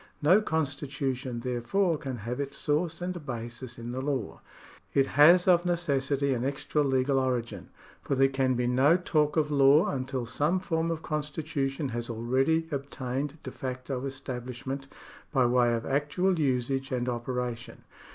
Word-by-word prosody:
No 180 +8 +5
con 160 -6 +1
stitution, 130 -3 -4
therefore, 125 +9 +1
can 135 -3 -5
have 120 +4 -5
its 140 0 -4
source 160 +3 -1
and 180 -2 -4
basis 120 -1 -6
in 120 0 -6
the 130 +1 -3
law. 135 -6 -3 0.5
It 135 - +5
has 165 +7 +6
of 175 -2 +5
necessity 140 -5 0
an 120 -1 -2
extra 140 +2 -1
legal 135 -1 +2
origin, 125 -3 -2 0.3
for 140 - -1
there 135 0 +5
can 135 -1 +1
be 120 0 0
no 130 +7 +4
talk 155 -4 +1
of 150 -1 +2
law, 140 +2 +6
until 130 -2 -3
some 150 +9 +1
form 165 -3 -1
of 165 -1 -3
constitution 150 -2 -2
has 120 0 -4
already 130 +8 +1
ob 140 0 -3
tained 135 +2 -3
de 130 - -6
facto 130 0 -5
establishment 130 0 -6 0.4
by 130 -4 +3
way 120 0 +3
of 115 - -4
actual 160 +6 +1
usage 135 0 0
and 125 -1 -1
operation. 120 -1 -4
135 Hz, 160 wpm, -28 LUFS, 125-150 Hz, 0.5 s, has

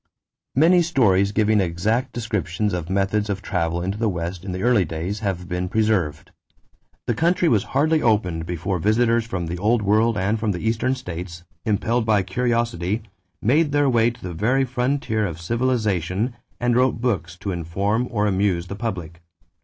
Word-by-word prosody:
= - - -65
Many 170 +6 +5
stories 100 - +3
giving 105 0 +3
exact 110 +9 0
descriptions 105 -4 -2
of 85 -1 -3
methods 100 +2 0
of 100 0 -3
travel 85 -2 -1
into 95 +3 -3
the 115 -2 +1
West 85 0 -4
in 95 - -5
the 95 +2 -4
early 120 -5 +4
days 85 +5 -4
have 95 -4 -3
been 90 +1 -2
preserved. 95 -9 0 0.7
The 120 - +1
country 170 +7 +2
was 110 -9 +2
hardly 155 +2 +3
opened 90 - +1
before 90 +2 -2
visitors 115 +4 +2
from 90 -7 -3
the 85 +2 -4
Old 110 +3 +2
World 110 +2 +3
and 105 +3 0
from 105 -2 0
the 90 +5 -3
Eastern 115 +4 +1
states, 85 -7 -7 0.2
impelled 110 +2 0
by 105 -3 +3
curiosity, 115 -4 -1 0.4
made 145 +6 +3
their 145 -1 +3
way 115 -1 +4
to 120 0 -10
the 90 -1 -5
very 125 +10 +1
frontier 125 -3 -1
of 80 -3 -6
civilization 110 -1 0 0.3
and 120 -1 +1
wrote 125 -1 +2
books 90 -9 -2
to 95 +2 -4
inform 95 +8 -1
or 105 -4 0
amuse 95 -3 +1
the 100 - -6
public. 90 -7 -5
105 Hz, 175 wpm, -22 LUFS, 90-120 Hz, 0.7 s, Many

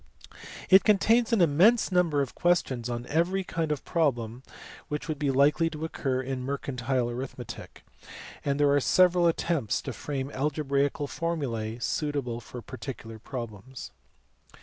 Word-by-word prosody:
It 190 +1 +8
contains 225 +3 +3
an 225 -5 +3
immense 185 +9 +4
number 170 -6 +2
of 130 - -7
questions 130 -9 +1
on 120 0 -4
every 175 +7 +1
kind 165 -3 -2
of 150 - -3
problem 120 -7 0 0.5
which 150 +1 -4
would 155 -3 -3
be 145 -2 0
likely 145 +5 +3
to 155 0 -5
occur 130 -5 -2
in 130 0 -3
mercantile 130 -2 -2
arithmetic, 125 -2 -7 0.6
and 140 0 0
there 145 -1 +4
are 145 - +4
several 180 +4 +4
attempts 165 -7 0
to - - -5
frame 140 -1 -4
algebraical 140 0 0
formulae 135 -9 -3
suitable 135 -2 -2
for 120 0 -9
particular 120 -4 -8
problems. 115 - -7
140 Hz, 140 wpm, -28 LUFS, 125-165 Hz, 0.6 s, It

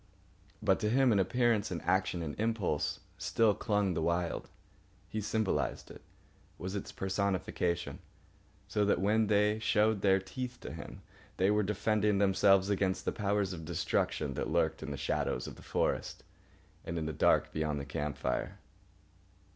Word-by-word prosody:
But 95 -2 +3
to 105 - 0
him, 130 +2 +4
in 100 - +3
appearance 110 +1 +2
and 85 - -3
action 95 -2 +1
and 75 -2 -4
impulse, 110 -9 -1 0.2
still 115 -2 +3
clung 105 -3 0
the 80 - -1
Wild. 85 +1 -1 0.6
He 110 - -3
symbolised 95 - -1
it, - - -12 0.6
was 95 +3 -5
its 100 - -4
personification: 95 -3 -1 0.7
so 105 - +1
that 100 - +2
when 105 +3 +2
they 105 +1 +3
showed 110 -1 +2
their 95 -1 +5
teeth 125 +6 -5
to - - -7
him 80 -2 -9 0.3
they 95 +2 +3
were 105 0 +3
defending 105 0 +1
themselves 95 -1 +4
against 95 -1 0
the - - +1
powers 100 -2 0
of 80 -2 -7
destruction 80 0 -1
that - - -3
lurked - - +1
in - - -5
the 70 - -4
shadows 65 -3 -1
of - - -7
the - - -14
forest - - -1 0.6
and 85 - -4
in 80 - -2
the 80 - -3
dark - - +3
beyond 75 -2 -1
the 70 - -5
camp 75 0 -3
fire. 65 - -2
95 Hz, 165 wpm, -32 LUFS, 85-105 Hz, 0.7 s, their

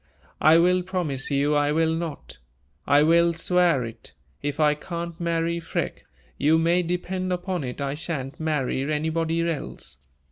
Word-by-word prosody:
"I 155 +1 +7
will 180 +2 +4
promise 175 -7 -2
you 145 +1 +2
I 145 0 +2
will 160 +1 +2
not 160 - -5 0.5
I 145 +1 +5
will 170 +2 +4
swear 170 -5 +2
it 115 0 -11 0.3
if 145 +1 -3
I 150 -1 +4
can't 170 +2 -6
marry 170 0 0
Freke, 165 - -4 0.3
you 155 +3 +4
may 170 +2 +3
depend 180 +1 -2
upon 180 -2 -2
it 125 +1 -5
I 140 -1 -2
sha'n't 145 -3 -5
marry 150 -5 -1
anybody 165 +2 0
else! 150 - -5
165 Hz, 150 wpm, -25 LUFS, 145-170 Hz, 0.5 s, I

